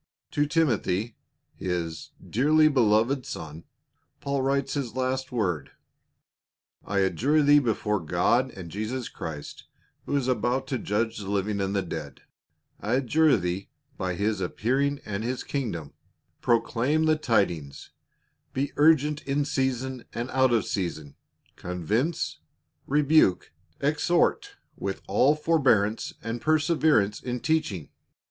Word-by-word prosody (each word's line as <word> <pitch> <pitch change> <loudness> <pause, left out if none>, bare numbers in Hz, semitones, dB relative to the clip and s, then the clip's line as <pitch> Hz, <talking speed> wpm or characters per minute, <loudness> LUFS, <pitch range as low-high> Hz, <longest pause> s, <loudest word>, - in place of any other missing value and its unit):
To 145 0 +1
Timothy, 120 - 0 0.4
his 85 -3 -4
" - - -16
dearly 155 +3 +5
beloved 125 0 +3
son," 80 -4 -7 0.5
Paul 140 -1 -1
writes 135 0 0
his 130 -5 -3
last 130 0 -1
word. 95 - -2 0.6
" - - -67 0.2
I 100 -1 0
adjure 140 +10 +2
thee 145 +1 +7
before 110 -5 0
God 90 - +1
and 90 -8 -9
Jesus 110 +4 -3
Christ, 75 -2 -7 0.4
who - - -1
is 130 -3 -1
about 125 +2 0
to 130 - -1
judge 110 +2 -1
the 100 -2 -6
living 100 0 -1
and 95 +1 -1
the 100 - +1
dead, 80 -4 -7 0.6
I 105 - -2
adjure 145 +4 +3
thee 90 +1 -3 0.3
by 90 -1 -2
his 100 +1 -1
appearing 135 +10 0
and 100 +1 -3
his 125 +2 -3
kingdom 100 - -4 0.2
— - - -47
proclaim 125 +6 +2
the 155 0 +4
tid 115 -11 +2
ings, 70 -5 -9 0.6
be 135 +1 -1
urgent 150 -1 +4
in 140 +1 +1
season 130 -2 -2
and 120 +2 -4
out 130 -1 +3
of 115 -2 +2
season, 80 -7 -3 0.4
convince, 105 - -2 0.5
rebuke, 145 - +3 0.3
exhort, 155 +4 +1 0.2
with 95 -1 -4
all 130 +9 +4
forbearance 130 -10 +2
and 115 +1 -4
perseverance 155 -8 +2
in 125 -1 -3
teaching. 120 - -1
120 Hz, 135 wpm, -26 LUFS, 100-140 Hz, 0.6 s, thee